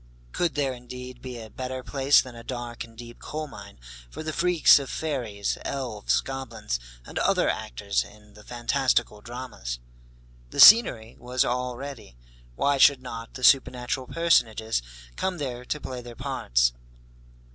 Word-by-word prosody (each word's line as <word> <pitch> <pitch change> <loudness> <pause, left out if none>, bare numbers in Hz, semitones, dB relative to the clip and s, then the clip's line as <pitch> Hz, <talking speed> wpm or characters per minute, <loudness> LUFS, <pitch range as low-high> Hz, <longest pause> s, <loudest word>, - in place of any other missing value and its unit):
Could 170 - -1
there 140 -3 0
indeed 125 0 -9
be 125 -2 -7
a 110 -1 -10
better 130 0 -5
place 135 +1 +4
than 130 - -10
a 115 - -10
dark 120 -1 -5
and 115 -1 -15
deep 120 0 -11
coal 155 0 -5
mine 100 - -12 0.3
for 110 - -8
the 155 0 -4
freaks 170 -3 +5
of 140 - -6
fairies, 120 -10 -3
elves, 125 -7 -1
goblins, 120 - -4 0.3
and - - -5
other - - +2
actors 100 +12 -1
in 105 0 -17
the 105 - -15
fantastical 120 -2 0
dramas? 120 - -6 0.7
The - - -6
scenery 120 - +8
was 125 +1 0
all 125 0 -2
ready, 130 - -9 0.4
why 140 - +1
should 135 -1 +6
not 115 -2 -8
the 130 - -8
supernatural 130 -1 +3
personages 115 - +2 0.4
come 190 -1 -1
there 125 -5 -4
to 150 - -3
play 130 -3 -6
their 120 -1 -10
parts? - - +1
125 Hz, 155 wpm, -26 LUFS, 115-135 Hz, 0.7 s, scenery